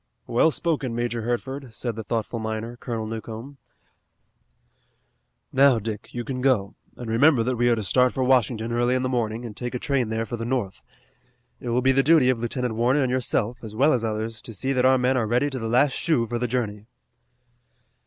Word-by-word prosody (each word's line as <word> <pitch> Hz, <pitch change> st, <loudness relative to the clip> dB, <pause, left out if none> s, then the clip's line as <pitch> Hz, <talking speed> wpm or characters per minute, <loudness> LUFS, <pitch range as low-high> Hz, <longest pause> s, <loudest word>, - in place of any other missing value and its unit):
"Well 120 Hz, +7 st, +3 dB
spoken, 145 Hz, -7 st, -1 dB
Major 120 Hz, 0 st, -2 dB
Hertford," 125 Hz, +2 st, -4 dB
said 120 Hz, -3 st, -3 dB
the 110 Hz, -, -5 dB
thoughtful 115 Hz, +1 st, -3 dB
miner, 110 Hz, +2 st, -4 dB
Colonel 115 Hz, -2 st, -4 dB
Newcomb. 115 Hz, +5 st, -7 dB, 2.0 s
"Now, 135 Hz, -2 st, +5 dB
Dick, 110 Hz, -1 st, -5 dB
you 120 Hz, -, -4 dB
can 125 Hz, 0 st, -4 dB
go, 125 Hz, -7 st, +2 dB, 0.2 s
and 120 Hz, -, -7 dB
remember 120 Hz, +3 st, +4 dB
that 125 Hz, +2 st, -1 dB
we 120 Hz, +1 st, +2 dB
are 120 Hz, -, +4 dB
to 110 Hz, -, -3 dB
start 125 Hz, +6 st, +3 dB
for 130 Hz, -, -1 dB
Washington 120 Hz, -3 st, +2 dB
early 120 Hz, +2 st, +1 dB
in 130 Hz, -, 0 dB
the 130 Hz, -, 0 dB
morning 120 Hz, -2 st, -2 dB
and 110 Hz, -3 st, -8 dB
take 125 Hz, 0 st, -5 dB
a -, -, +1 dB
train 130 Hz, -3 st, 0 dB
there 110 Hz, 0 st, -1 dB
for 120 Hz, +2 st, -5 dB
the 115 Hz, -, -4 dB
north. 115 Hz, -5 st, -2 dB, 0.8 s
It 120 Hz, -, -5 dB
will 120 Hz, +2 st, +1 dB
be 135 Hz, -, +5 dB
the 135 Hz, +1 st, +4 dB
duty 145 Hz, -3 st, +5 dB
of 125 Hz, -, -2 dB
Lieutenant 120 Hz, 0 st, -2 dB
Warner 125 Hz, +5 st, +2 dB
and 125 Hz, -, 0 dB
yourself, 125 Hz, -2 st, 0 dB
as 110 Hz, -2 st, -8 dB
well 140 Hz, +6 st, +4 dB
as 120 Hz, -3 st, 0 dB
others, 110 Hz, 0 st, -3 dB
to 115 Hz, -, -9 dB
see 135 Hz, +8 st, -1 dB
that 130 Hz, -1 st, +2 dB
our 130 Hz, 0 st, +5 dB
men 130 Hz, +1 st, +2 dB
are 115 Hz, -3 st, 0 dB
ready 125 Hz, +6 st, +1 dB
to 130 Hz, -, -4 dB
the 115 Hz, -, -3 dB
last 130 Hz, +4 st, +4 dB
shoe 150 Hz, -8 st, +1 dB
for 120 Hz, +1 st, -3 dB
the 125 Hz, -, 0 dB
journey." 110 Hz, -4 st, -3 dB
120 Hz, 215 wpm, -24 LUFS, 115-130 Hz, 2.0 s, Now